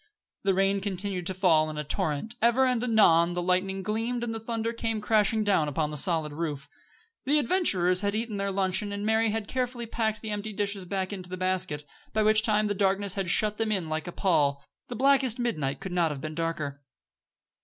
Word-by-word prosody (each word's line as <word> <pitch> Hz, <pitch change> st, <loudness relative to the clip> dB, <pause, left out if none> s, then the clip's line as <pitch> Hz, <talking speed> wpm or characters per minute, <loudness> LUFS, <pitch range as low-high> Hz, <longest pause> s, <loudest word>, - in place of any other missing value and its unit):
The 195 Hz, -1 st, +1 dB
rain 195 Hz, +1 st, +2 dB
continued 190 Hz, -2 st, -3 dB
to 190 Hz, -, -2 dB
fall 165 Hz, -5 st, +3 dB
in 155 Hz, -, -6 dB
a 150 Hz, -, -2 dB
torrent, 160 Hz, +6 st, -2 dB
ever 240 Hz, +3 st, +4 dB
and 250 Hz, -2 st, +1 dB
anon 175 Hz, -8 st, +4 dB
the 175 Hz, -, -2 dB
lightning 190 Hz, +2 st, 0 dB
gleamed 225 Hz, +4 st, -2 dB
and 230 Hz, -1 st, -3 dB
the 225 Hz, -, -4 dB
thunder 230 Hz, 0 st, -3 dB
came 225 Hz, -1 st, -2 dB
crashing 215 Hz, +1 st, +2 dB
down 195 Hz, -7 st, +2 dB
upon 150 Hz, +1 st, -1 dB
the -, -, -5 dB
solid 155 Hz, -1 st, +1 dB
roof. 150 Hz, -3 st, -4 dB, 0.6 s
The 290 Hz, +3 st, +3 dB
adventurers 200 Hz, -, +3 dB
had 200 Hz, 0 st, -1 dB
eaten 220 Hz, -1 st, -3 dB
their 200 Hz, 0 st, -1 dB
luncheon 190 Hz, +1 st, +1 dB
and 200 Hz, +1 st, -4 dB
Mary 220 Hz, +1 st, +2 dB
had 215 Hz, -1 st, -3 dB
carefully 250 Hz, -1 st, -3 dB
packed 220 Hz, -2 st, -2 dB
the 220 Hz, -, -5 dB
empty 210 Hz, +1 st, -4 dB
dishes 200 Hz, -2 st, -2 dB
back 190 Hz, +1 st, -3 dB
into 185 Hz, -2 st, -8 dB
the 185 Hz, -, -5 dB
basket, 185 Hz, -5 st, -1 dB, 0.3 s
by 215 Hz, -, +2 dB
which 215 Hz, 0 st, +5 dB
time 215 Hz, -1 st, +2 dB
the 205 Hz, -, 0 dB
darkness 195 Hz, 0 st, 0 dB
had 195 Hz, -3 st, -2 dB
shut 210 Hz, +2 st, +2 dB
them 225 Hz, -1 st, -1 dB
in 185 Hz, -6 st, -1 dB
like 155 Hz, +1 st, -3 dB
a -, -, -4 dB
pall. 145 Hz, -7 st, +1 dB, 0.2 s
The 245 Hz, -, -6 dB
blackest 265 Hz, -1 st, +3 dB
midnight 155 Hz, -, -2 dB
could 190 Hz, -, -6 dB
not 175 Hz, -2 st, +2 dB
have 145 Hz, -2 st, -5 dB
been 155 Hz, +2 st, -6 dB
darker. 155 Hz, -4 st, -3 dB
200 Hz, 210 wpm, -27 LUFS, 175-220 Hz, 0.6 s, which